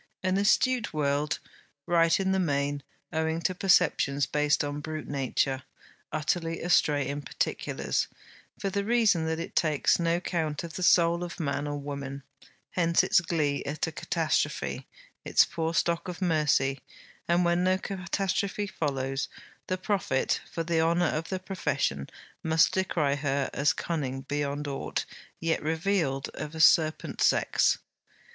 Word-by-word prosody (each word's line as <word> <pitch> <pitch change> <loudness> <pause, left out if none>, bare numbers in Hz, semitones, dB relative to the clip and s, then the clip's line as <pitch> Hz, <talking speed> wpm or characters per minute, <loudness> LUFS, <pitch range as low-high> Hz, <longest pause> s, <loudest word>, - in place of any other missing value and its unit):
An 185 +1 +1
astute 230 0 +2
world; 145 0 0 0.5
right 165 0 +3
in 190 0 +1
the 190 - +2
main, 145 -4 0 0.3
owing 160 +1 0
to 185 - 0
perceptions 165 -7 +3
based 150 +2 +1
upon 145 0 -3
brute 155 +1 -5
nature; 135 -1 0 0.5
utterly 165 +2 -1
astray 150 -5 +2
in 145 +1 -3
particulars, - - -2 0.5
for 195 - -3
the 200 +1 -1
reason 210 -7 +3
that 160 0 -1
it 165 - -6
takes 155 -1 +2
no 170 0 +1
count 160 -4 -2
of 165 -2 -7
the 185 - -5
soul 170 -1 +4
of 175 0 -7
man 145 -2 -1
or 145 0 -3
woman. 140 -1 -6 0.5
Hence 170 -2 +3
its - - +4
glee 155 -4 0
at 145 +2 -2
a 160 - -5
catastrophe; 160 0 -1 0.4
its - - +4
poor 165 -1 -2
stock 170 +1 0
of 180 -1 -6
mercy. 150 -6 +2 0.5
And 175 +1 +3
when 175 +1 +2
no 185 0 +3
catastrophe 195 +2 -2
follows, 135 -7 -2 0.4
the 185 - -1
prophet, 185 -8 0
for 165 - -2
the 165 -1 +1
honour 170 +2 +2
of 160 +1 -3
the 190 - -1
profession, 145 - -2 0.3
must 160 0 +3
decry 165 -6 +1
her 140 -1 -1
as 145 +2 +3
cunning 135 -6 -3
beyond 145 +1 -3
aught 140 -1 -3 0.3
yet 165 0 0
revealed 160 -3 0
of 150 +1 -7
a - - -6
serpent 155 0 +3
sex. - - +3
160 Hz, 150 wpm, -28 LUFS, 145-175 Hz, 0.5 s, soul